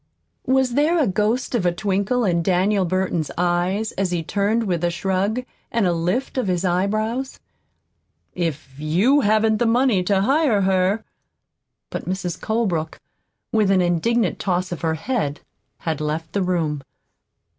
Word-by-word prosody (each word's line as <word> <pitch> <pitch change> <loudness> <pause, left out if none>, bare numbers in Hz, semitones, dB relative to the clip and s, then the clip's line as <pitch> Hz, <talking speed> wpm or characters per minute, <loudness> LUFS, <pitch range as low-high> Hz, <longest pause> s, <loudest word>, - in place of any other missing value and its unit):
(Was 260 -1 +2
there 305 +6 +3
a 310 - +3
ghost 215 +7 0
of 235 -6 +1
a 175 - +3
twinkle 200 +6 0
in 170 -3 +2
Daniel 190 +3 +2
Burton's 180 -3 -1
eyes 180 +5 0
as 195 -1 -1
he 175 -2 -1
turned 205 +6 0
with 175 -5 -1
a 175 - +3
shrug 190 +6 -1 0.3
and 230 -3 +1
a 175 - +2
lift 180 +11 -1
of 250 - -1
his 180 0 0
eyebrows?) 215 +8 -1 0.9
"If 150 -6 -4
YOU 190 - +3
haven't 215 0 +3
the 240 - +2
money 235 -4 +3
to 195 0 +2
hire 265 -2 +3
her 190 +2 +2 0.5
" - - -58
But - - -5
Mrs. 180 -2 -3
Colebrook, 190 -9 -1 0.5
with 215 -3 +2
an 190 -2 +4
indignant 180 +5 +1
toss 180 -1 -1
of 175 - -5
her 160 -2 0
head, 160 - -2 0.4
had 160 -3 -3
left 155 +2 -3
the 200 - 0
room. 165 -6 -1
190 Hz, 155 wpm, -22 LUFS, 175-220 Hz, 0.9 s, an